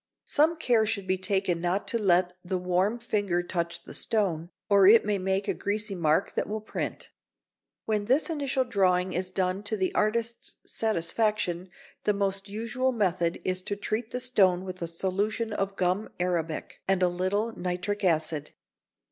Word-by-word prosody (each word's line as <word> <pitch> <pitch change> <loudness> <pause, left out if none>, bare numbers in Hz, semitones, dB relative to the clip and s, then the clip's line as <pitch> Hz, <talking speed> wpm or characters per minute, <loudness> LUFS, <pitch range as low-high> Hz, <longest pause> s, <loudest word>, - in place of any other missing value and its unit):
Some 320 +3 +3
care 235 -7 +2
should 205 -3 -1
be 185 0 0
taken 190 -3 0
not 180 +3 0
to 230 - +1
let 180 -3 +3
the 185 +1 -1
warm 180 +5 +1
finger 205 -7 0
touch 170 -1 -3
the - - -10
stone, 175 -7 0 0.2
or 200 -2 +6
it 220 +2 +7
may 205 -1 +1
make 190 +2 0
a - - +1
greasy 210 0 -1
mark 165 0 +1
that - - -2
will 215 +1 -2
print. 215 - -5 0.7
When 210 -2 0
this 265 +7 +3
initial 280 -5 0
drawing 185 -5 +1
is 185 +1 -2
done 185 0 -1
to 215 +1 -1
the 190 -1 0
artist's 230 +2 -1
satisfaction, 210 -2 0 0.4
the 210 - +3
most 195 0 -2
usual 230 +5 -1
method 180 -7 0
is 185 0 0
to 205 - -3
treat 215 +3 -3
the 250 - -3
stone 190 -8 +2
with 185 -1 -7
a 170 - -2
solution 200 +6 -1
of 195 -1 -2
gum 185 +3 0
arabic 170 -3 -2
and 190 -1 +2
a - - +5
little 190 +6 -1
nitric 180 +3 -3
acid. 155 -4 0
195 Hz, 170 wpm, -28 LUFS, 180-215 Hz, 0.7 s, it